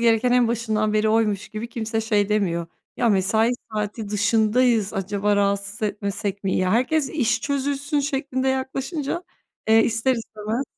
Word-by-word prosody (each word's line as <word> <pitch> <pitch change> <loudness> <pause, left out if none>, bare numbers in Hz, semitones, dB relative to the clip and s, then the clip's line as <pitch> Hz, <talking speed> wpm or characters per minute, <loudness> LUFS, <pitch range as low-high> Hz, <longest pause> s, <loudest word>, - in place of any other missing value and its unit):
gereken 235 +1 +3
en 245 -2 +4
başından 215 -2 0
beri 215 0 +2
oymuş 215 -2 +1
gibi 215 +2 -6
kimse 225 -1 -2
şey 210 -2 +1
demiyor, 180 -6 0 0.3
"Ya, 240 - +2
mesai 220 +3 +2 0.2
saati 210 0 -3
dışındayız, 220 +1 +2
acaba 205 +1 0
rahatsız 200 +1 -1
etmesek 200 -1 -3
mi?" 190 - 0
Ya 185 0 +1
herkes 270 +5 +2
işi 250 -7 +1
çözülsün 285 +1 -1
şeklinde 270 -2 -1
yaklaşınca, 270 +5 -2 0.5
eee, 225 0 +6
ister 230 +3 +1
istemez. 225 +1 -4
220 Hz, 145 wpm, -23 LUFS, 205-250 Hz, 0.5 s, eee